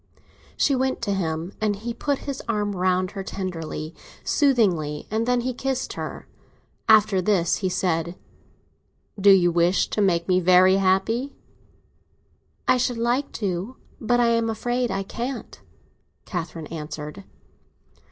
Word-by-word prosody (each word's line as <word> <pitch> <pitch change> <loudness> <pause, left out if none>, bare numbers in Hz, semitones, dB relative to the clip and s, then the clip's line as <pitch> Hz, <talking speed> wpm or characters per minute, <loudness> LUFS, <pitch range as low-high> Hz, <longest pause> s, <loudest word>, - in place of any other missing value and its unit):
She 280 - +3
went 260 0 0
to 200 - 0
him, 170 -1 -2
and 210 -1 +1
he 230 +4 -5
put 285 +3 -1
his 275 -2 -4
arm 205 -2 0
round 185 0 +1
her 195 - -5
tenderly, 170 -5 -5 0.3
soothingly; 185 - +1
and 225 +2 0
then 245 -1 +2
he 255 +1 -2
kissed 265 +1 -2
her. - - -6 0.6
After 215 -3 +5
this 180 -3 +2
he 190 - -1
said: 175 -2 -1 1.0
"Do 200 +1 +5
you 180 -3 +6
wish 175 +2 +2
to 210 - -1
make 170 -4 +2
me 185 -1 +3
very 185 +1 +5
happy?" 220 +8 +1 1.3
"I - - +5
should 245 -1 0
like 240 +4 0
to—but 215 +4 -3
I 240 -1 +4
am 230 -1 +1
afraid 240 +2 -1
I 195 -1 -2
can't," 240 +6 -6 0.6
Catherine 165 -3 -5
answered. 150 -7 -6
195 Hz, 135 wpm, -24 LUFS, 175-235 Hz, 1.3 s, you